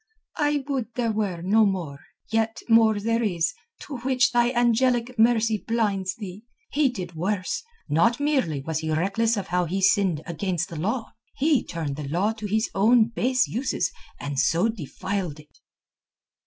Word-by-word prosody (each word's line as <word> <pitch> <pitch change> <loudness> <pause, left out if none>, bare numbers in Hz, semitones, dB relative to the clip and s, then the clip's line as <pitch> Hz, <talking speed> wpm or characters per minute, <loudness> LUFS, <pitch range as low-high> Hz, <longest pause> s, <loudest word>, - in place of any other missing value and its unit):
"I 295 -1 +1
would 250 -5 -3
there 235 -2 0
were 200 -6 -2
no 215 +4 +4
more. 175 -9 -1 0.3
Yet 225 0 0
more 225 -2 +5
there 230 +2 0
is, 175 -7 0 0.3
to 280 - -6
which 255 +1 +2
thy 240 -1 +3
angelic 240 0 +2
mercy 225 -1 +3
blinds 200 -5 -1
thee. 200 0 -8 0.3
He 290 -2 +3
did 185 -8 -6
worse. 185 - -2 0.3
Not 190 - +2
merely 265 - 0
was 160 +2 -2
he 160 0 -4
reckless 200 +8 +1
of 195 -2 -4
how 180 0 +1
he 185 +4 -2
sinned 190 -5 +2
against 175 0 -2
the 170 - -8
law, 220 +7 -2 0.2
he 290 -2 +2
turned 155 -5 -4
the 150 -2 -5
law 185 +8 +1
to 215 -1 -6
his 220 +3 +1
own 225 +3 +4
base 255 +1 +1
uses 260 +4 -1 0.3
and 145 -2 -3
so 175 +11 +3
defiled 185 - -4
it." 150 0 -19
215 Hz, 165 wpm, -25 LUFS, 175-235 Hz, 0.3 s, more